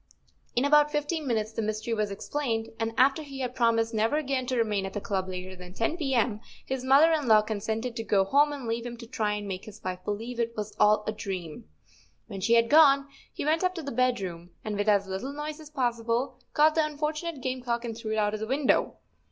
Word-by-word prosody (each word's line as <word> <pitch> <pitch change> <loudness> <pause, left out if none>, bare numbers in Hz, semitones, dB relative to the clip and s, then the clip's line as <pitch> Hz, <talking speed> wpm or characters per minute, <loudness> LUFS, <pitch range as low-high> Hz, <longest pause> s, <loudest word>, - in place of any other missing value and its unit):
In 245 +3 +2
about 295 +1 +5
fifteen 295 +1 -2
minutes 220 -3 0
the 225 - -3
mystery 215 +2 -2
was 215 -2 0
explained, 225 +2 -2
and 225 0 -1
after 270 +4 +4
he 275 -3 -7
had 250 -1 -2
promised 230 -2 +2
never 220 +5 +1
again 270 -4 -1
to 255 - -1
remain 210 -4 +1
at 195 - -5
the 205 - -2
club 190 -3 -2
later 185 0 -6
than 180 0 -12
ten 230 - 0
p. 280 -6 -1
m., 225 -3 +1 0.3
his 260 -1 -3
mother 280 +5 +6
in 300 -5 0
law 215 -1 +6
con¬ 215 0 -3
sented 225 +4 -3
to 225 - -3
go 200 -3 +3
home 290 +8 +4
and 280 -4 -6
leave 230 +1 -2
him 240 0 -6
to 235 - -9
try 215 -3 -1
and 205 -1 -4
make 190 -1 -5
his 215 0 -11
wife 185 -1 -3
believe 225 +5 -4
it 230 0 -1
w - - -22
r - - 0
as 210 0 -8
all 210 0 +5
a - - 0
dream. 185 - -6 0.6
When 195 - -7
she 230 +5 +4
had 230 0 +4
gone 280 -1 +6 0.2
he - - -5
went 315 +4 +2
up 365 0 +1
to 330 - -5
the 280 - -4
bed 250 0 +2
room, 175 -2 -6 0.2
and, 215 -1 -2
with 205 +1 0
as 200 -1 +4
little 190 +9 -4
noise 300 +1 -5
as 310 -1 -11
possible, 245 -2 -1 0.2
caught 305 +1 +5
the 320 - +3
un¬ 305 -1 -3
fortunate 305 +1 -2
game 255 0 -3
cock 240 -1 -2
and 230 -2 -4
threw 220 -1 -4
it - - -1
out 210 -1 +1
of 215 - -3
the 220 - -4
window. 270 +2 +1
230 Hz, 255 wpm, -28 LUFS, 210-275 Hz, 0.6 s, mother